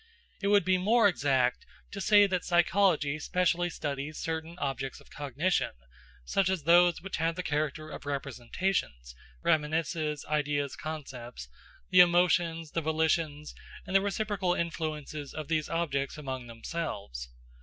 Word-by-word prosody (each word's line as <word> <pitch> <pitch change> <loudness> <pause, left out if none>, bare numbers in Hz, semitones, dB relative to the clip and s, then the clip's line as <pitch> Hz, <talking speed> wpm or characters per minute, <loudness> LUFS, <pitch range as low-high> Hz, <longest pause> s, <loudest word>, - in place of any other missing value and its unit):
It 200 - 0
would 205 0 +4
be 185 0 +3
more 220 +3 +5
exact 135 -8 +1 0.3
to 200 - -5
say 205 0 +6
that 185 -3 -1
psychology 175 -4 +2
specially 175 +1 +1
studies 145 -1 -4
certain 160 +1 -4
objects 135 -4 -3
of - - -20
cognition, 145 +5 -1 0.5
such 190 - +1
as 190 -5 -1
those 175 +1 +5
which 195 - -4
have 165 +1 0
the 180 - -3
character 155 0 -2
of 145 - -8
representations 135 - -2 0.3
(reminiscences, 155 -1 0
ideas, 145 -2 0
concepts), 130 - -7 0.4
the 185 - +6
emotions, 170 -2 +4
the 165 - -1
volitions, 155 -1 0 0.3
and 190 - -4
the 195 - +6
reciprocal 200 -2 -1
influences 155 -3 -4
of 155 -1 -6
these 155 -2 0
objects 145 -5 -1
among 130 -4 -5
themselves. 115 - -5
160 Hz, 135 wpm, -29 LUFS, 145-175 Hz, 0.5 s, say